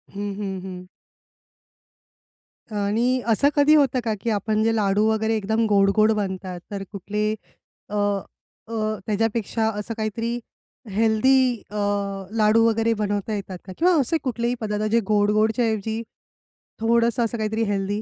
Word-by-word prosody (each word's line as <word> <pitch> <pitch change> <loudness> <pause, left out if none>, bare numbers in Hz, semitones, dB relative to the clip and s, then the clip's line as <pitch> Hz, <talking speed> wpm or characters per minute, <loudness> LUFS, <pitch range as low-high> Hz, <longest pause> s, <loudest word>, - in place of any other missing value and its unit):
हं, 205 0 -3
हं, 195 -2 -3
हं. 180 -1 -8 1.9
आणि 230 +5 +1
असं 235 +6 +4
कधी 295 +1 +5
होतं 270 -4 +3
का, 220 -1 0
की 235 - -1
आपण 215 0 0
जे 225 0 +2
लाडू 205 0 +2
वगैरे 220 0 +1
एकदम 220 +2 0
गोड-गोड 205 +2 +4
बनतात. 190 -3 -3
तर 200 -1 -4
कुठले 210 +2 -2 0.6
अ 210 - -4 0.7
अ, 215 -1 -1
त्याच्यापेक्षा 220 +1 0
असं 225 +2 -4
काहीतरी 230 +2 -2 0.5
हेल्दी 230 +4 +3
अ, 210 - -10 0.6
लाडू 220 +1 +4
वगैरे 225 0 +2
बनवता 205 0 -2
येतात 195 -2 -5
का 185 - -8
किंवा 360 +2 +4
असे 280 +5 +1
कुठलेही 240 -1 -1
पदार्थ 210 -1 -2
जे 230 - +4
गोड 210 -1 +3
गोडच्या 220 +3 +2
ऐवजी 220 0 -1 0.8
थोडंसं 235 +1 +2
असं 230 +1 -3
काहीतरी 220 +1 -1
हेल्दी? 200 +1 -1
215 Hz, 140 wpm, -23 LUFS, 205-230 Hz, 1.9 s, कधी